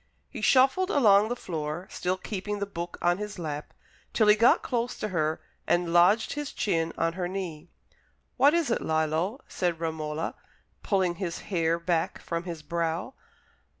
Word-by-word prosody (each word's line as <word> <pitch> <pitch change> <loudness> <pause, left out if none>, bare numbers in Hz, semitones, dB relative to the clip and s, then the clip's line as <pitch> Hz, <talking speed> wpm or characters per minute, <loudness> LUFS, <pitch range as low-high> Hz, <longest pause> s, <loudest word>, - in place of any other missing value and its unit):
He - - -7
shuffled 270 +9 +4
along 215 - +5
the 245 - -1
floor, 160 -4 -4
still 185 +1 -1
keeping 205 +1 -4
the 200 - -2
book 175 -3 -6
on 175 +2 +2
his 210 -1 -5
lap, 150 -3 -5 0.4
till 215 -2 +4
he 210 - +8
got 230 +3 +4
close 240 0 -1
to 215 - -3
her 155 -3 0 0.3
and 175 -1 +1
lodged 180 +6 +4
his 295 -1 -5
chin 165 -5 0
on 165 - +1
her 180 0 -2
knee. 175 -3 -5 0.7
"What 285 +5 +5
is 330 -7 +1
it, - - +1
Lillo?" 160 - 0
said 175 -3 -1
Romola, 160 -1 -3 0.5
pulling 185 -4 +1
his 175 -3 -2 0.2
hair 165 -1 +2
back 170 -1 -1
from 170 +1 -4
his 165 -4 -6
brow. 170 - -2
175 Hz, 165 wpm, -27 LUFS, 165-210 Hz, 0.7 s, he